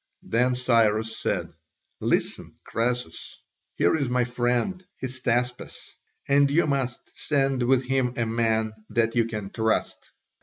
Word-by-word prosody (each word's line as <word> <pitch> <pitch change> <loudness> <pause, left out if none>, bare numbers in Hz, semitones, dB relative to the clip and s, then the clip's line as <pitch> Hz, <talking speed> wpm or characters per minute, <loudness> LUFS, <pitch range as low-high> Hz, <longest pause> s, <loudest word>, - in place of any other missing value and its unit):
Then 125 +2 +1
Cyrus 110 -3 +2
said, - - -2 0.5
"Listen, - - -1
Croesus, 120 -6 -3 0.4
here - - +3
is 140 -5 -1
my 125 0 +2
friend, 125 +9 -1 0.2
Hystaspas, 125 -1 -2 0.4
and 140 0 +4
you 160 +5 +3
must 135 -4 -2
send 135 -3 0
with 130 +1 +3
him 125 -1 0
a 115 - +1
man 110 -1 0 0.2
that 115 0 +1
you 115 -1 +3
can 105 -3 -5
trust." 110 -1 -1
125 Hz, 125 wpm, -25 LUFS, 115-130 Hz, 0.5 s, and